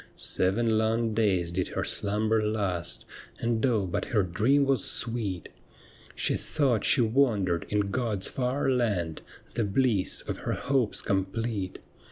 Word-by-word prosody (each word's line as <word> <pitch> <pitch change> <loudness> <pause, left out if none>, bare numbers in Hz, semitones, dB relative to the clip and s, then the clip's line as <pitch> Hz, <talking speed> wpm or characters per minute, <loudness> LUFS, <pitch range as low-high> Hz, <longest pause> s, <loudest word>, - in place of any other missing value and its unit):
Seven 110 +4 +3
long 110 0 +1
days 95 -6 +1
did 90 +1 -1
her - - -3
slumber 110 +2 0
last, 95 - -1 0.3
And 115 -1 -1
oh 115 -7 +2
but 90 - -2
her 105 -4 +1
dream 115 +11 +2
was 135 -2 +1
sweet! 110 -7 -2 0.7
She - - +1
thought 130 -8 0
she 135 - +4
wandered 110 -8 +1
in 105 -1 0
God's 110 -5 0
far 130 +2 -1
land. 100 -11 0 0.3
The 115 - 0
bliss 105 -1 +1
of - - -4
her - - -3
liopes 135 -6 0
complete. 100 0 -2
110 Hz, 140 wpm, -28 LUFS, 95-120 Hz, 0.7 s, she